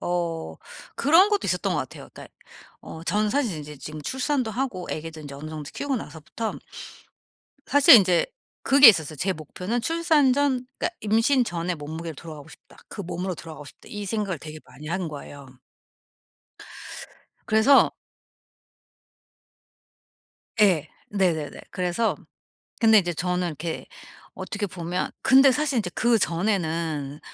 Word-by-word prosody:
어 170 -2 -3 0.4
그런 330 +8 +5
것도 415 -1 0
있었던 - - 0
것 - - 0
같아요. - - -9
그러니까 - - -13 0.5
어 160 - -10
전 210 +1 +1
사실 250 - 0
인제 150 0 -9
지금 155 +2 -8
출산도 260 - -1
하고 220 -6 -3
애기도 160 0 -6
인제 145 -2 -9
어느 150 +3 -8
정도 155 -2 -7
키우고 280 -2 -2
나서부터 170 +4 -6 1.1
사실 285 -1 +8
인제 185 -5 +3 0.4
그게 275 -1 +8
있었어요. 160 -7 +3
제 190 +6 0
목표는 180 - -4
출산 325 -4 +3
전 260 -2 0
그러니까 - - -1
'임신 230 +5 +2
전에 175 -3 -3
몸무게로 160 +2 -7
돌아가고 155 -1 -10
싶다. 160 - -17
그 200 - -7
몸으로 180 +1 -4
돌아가고 160 -2 -10
싶다.' - - -15
이 205 -1 -5
생각을 200 -5 -2
되게 155 +1 -9
많이 150 +4 -13
한 175 0 -2
거예요. 145 -1 -10 2.0
그래서 220 +6 +5 2.7
예. 175 -7 +4 0.2
네네네. 175 -7 -1
그래서 180 +5 -1 0.6
근데 220 -2 +6
이제 175 -2 -2
저는 180 +1 -1
이렇게 160 +1 -5 0.5
어떻게 205 -1 -4
보면 175 0 -4
근데 270 +1 +6
사실 285 -2 0
이제 185 - -3
그전에는 165 -9 0
180 Hz, 300 characters per minute, -25 LUFS, 160-235 Hz, 2.7 s, 사실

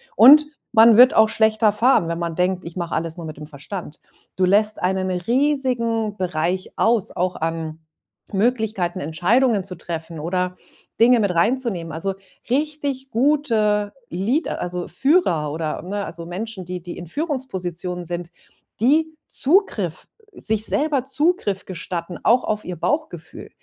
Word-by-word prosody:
Und 285 +7 +8 0.3
man 225 0 +7
wird 250 +1 +8
auch 220 0 +6
schlechter 220 0 +3
fahren, 225 -5 +3
wenn 170 0 -3
man 170 -1 -3
denkt: 180 +1 0
„Ich 170 - -8
mach 170 -1 -4
alles 165 +1 -2
nur 170 - -7
mit 155 -1 -8
dem 150 - -9
Verstand.“ 150 +3 -8 0.4
Du 185 - +3
lässt 210 +3 +2
einen 185 +1 0
riesigen 235 - 0
Bereich 180 +1 -2
aus, 225 -3 +2
auch 180 0 -1
an 160 -1 -4 0.5
Möglichkeiten, 210 -4 0
Entscheidungen 200 - +1
zu 180 -1 -4
treffen 165 -1 -6
oder 180 +3 -2 0.4
Dinge 240 +1 +6
mit 200 -4 +1
reinzunehmen. 215 -4 0
Also, 190 +5 -3 0.4
richtig 280 -1 -2
gute 225 -6 +1 0.2
Lead 220 - -1
also, 180 0 -4
Führer 270 - +1
oder, 155 0 -3
ne 200 +4 -4
also 170 0 -7
Menschen, 190 +3 -6
die 180 0 -6
die 175 0 -8
in 175 - -8
Führungspositionen 185 - -4
sind, 175 0 -4 0.5
die 315 +6 +2
Zugriff 265 - +2 0.3
sich 220 - -2
selber 290 -3 0
Zugriff 275 - +1
gestatten, 175 -1 -6
auch 245 +3 +4
auf 215 0 -2
ihr 180 - -5
Bauchgefühl, 175 - -4
195 Hz, 145 wpm, -21 LUFS, 175-245 Hz, 0.5 s, Und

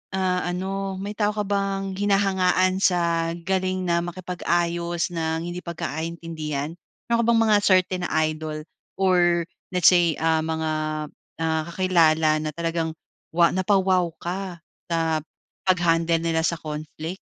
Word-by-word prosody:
ah, 185 -1 +1
ano, 190 +2 -3
may 200 +2 -4
tao 210 0 +1
ka 210 - 0
bang 195 -1 -1
hinahangaan 190 -2 +2
sa 170 -2 +2
galing 185 +1 -1
na 170 0 +2
makipag-ayos 175 -1 -1
ng 160 0 -1
hindi 175 +1 -4
pagkakaintindihan? 160 -2 -4 0.4
Meron 235 0 +2
ka - - 0
bang 230 - +4
mga 215 -1 +4
certain 185 -1 +3
na - - -9 0.2
idol 155 0 -5 0.4
or 175 -2 +3 0.3
let's 180 - +5
say, 170 -3 +3
ah, 160 0 +2
mga, 160 0 -1 0.7
ah, 160 -1 +1
kakilala 165 -4 +3
na 155 - -2
talagang 165 -1 -1 0.4
wa 170 0 +6
napa-wow 185 -1 +3
ka 180 0 -4 0.3
sa 165 -1 +1 0.5
pag-handle 170 -2 +3
nila 165 -1 +1
sa 170 - 0
conflict? 155 +3 -6
175 Hz, 130 wpm, -24 LUFS, 165-185 Hz, 0.7 s, wa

